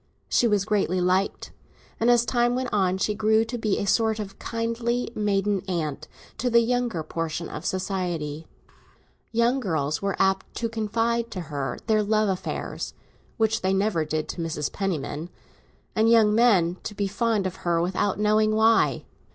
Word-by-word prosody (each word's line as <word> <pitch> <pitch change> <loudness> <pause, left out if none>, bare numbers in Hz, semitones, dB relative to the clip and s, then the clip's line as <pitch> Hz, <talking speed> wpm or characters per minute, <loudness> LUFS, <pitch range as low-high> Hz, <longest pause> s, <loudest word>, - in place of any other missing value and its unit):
She 240 - +3
was 205 -3 +1
greatly 200 -4 +1
liked, 185 +2 0 0.5
and 230 - +3
as 240 -1 +5
time 240 0 +2
went 255 0 -3
on 190 -2 +2
she 210 +2 0
grew 220 +1 +2
to 245 - -5
be 220 -4 0
a - - -1
sort 220 +2 +2
of 205 -2 -7
kindly 230 +1 -2
maiden 205 -2 0
aunt 155 -4 -3 0.3
to 250 - 0
the 235 0 +5
younger 235 -7 0
portion 165 +1 -3
of - - -6
society. 175 -5 -3 0.8
Young 235 +3 +2
girls 155 - -1
were 200 0 -1
apt 190 0 +1
to 230 - -2
confide 230 +1 -1
to 185 - -5
her 135 -3 -2
their 220 -1 +3
love 215 0 +2
affairs 185 -1 -4 0.4
(which 220 -1 +1
they 190 +1 +1
never 195 -4 +1
did 155 0 -2
to 175 - -4
Mrs. 155 -3 -2
Penniman), 170 -4 -3 0.7
and 220 +1 +3
young 220 -2 +5
men 195 -7 +4
to 210 - -6
be 200 - -1
fond 210 0 0
of 185 0 -3
her 170 -1 0
without 185 +3 0
knowing 215 +1 +3
why. 225 +1 +3
205 Hz, 165 wpm, -25 LUFS, 180-225 Hz, 0.8 s, as